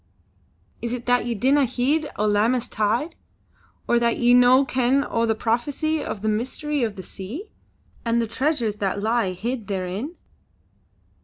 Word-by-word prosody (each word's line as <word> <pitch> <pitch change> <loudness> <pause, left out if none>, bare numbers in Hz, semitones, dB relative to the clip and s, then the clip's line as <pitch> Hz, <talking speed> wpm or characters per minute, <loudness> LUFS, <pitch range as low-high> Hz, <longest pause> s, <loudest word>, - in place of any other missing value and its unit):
Is 235 +1 -3
it 245 -1 -5
that 245 -1 +2
ye 235 - -1
dinna 270 +6 +3
heed 275 +5 0
o' 210 - 0
Lammas 225 +4 +2
tide, 230 +10 0 0.7
or 240 - +3
that 235 -1 +1
ye 245 0 +4
no 250 +2 +6
ken 260 +2 +1
o' 230 0 0
the 220 - +2
prophecy 280 +8 -1
of 205 - -5
the - - 0
Mystery 260 +7 -1
of 220 -4 -1
the 185 - -8
Sea 240 - -8 0.5
and 235 0 +1
the 230 - +1
treasures 235 -3 -1
that 200 -1 -1
lie 225 -4 +1
hid 225 +4 -4
therein." 195 - -4
235 Hz, 160 wpm, -23 LUFS, 215-265 Hz, 0.7 s, no